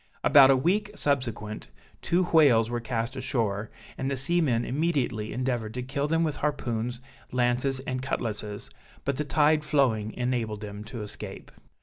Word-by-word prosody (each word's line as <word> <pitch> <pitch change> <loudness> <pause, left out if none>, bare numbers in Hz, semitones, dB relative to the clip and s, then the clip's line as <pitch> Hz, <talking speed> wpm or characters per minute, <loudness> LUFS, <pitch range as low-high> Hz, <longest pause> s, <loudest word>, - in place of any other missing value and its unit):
About 140 -2 +8
a 135 - +6
week 200 +10 +1
subsequent, 115 - -2 0.3
two 175 +2 +2
whales 135 -10 +4
were 120 - -1
cast 115 +1 -3
ashore, 110 -6 -1 0.3
and 135 - -1
the 140 - -1
seamen 135 -4 +1
immediately 135 -8 -1
endeavored 120 -4 -2
to 125 - -3
kill 140 +3 -2
them 165 +2 +2
with 150 -3 -1
harpoons, 120 -5 -2 0.3
lances, 125 +2 +1
and 130 -1 -3
cutlasses, 105 -5 -3 0.3
but 140 -1 0
the 150 - 0
tide 150 +1 +3
flowing 125 -8 +1
enabled 120 -4 -1
them 105 0 -7
to 115 -1 -6
escape. 105 - -8
125 Hz, 150 wpm, -27 LUFS, 115-145 Hz, 0.3 s, About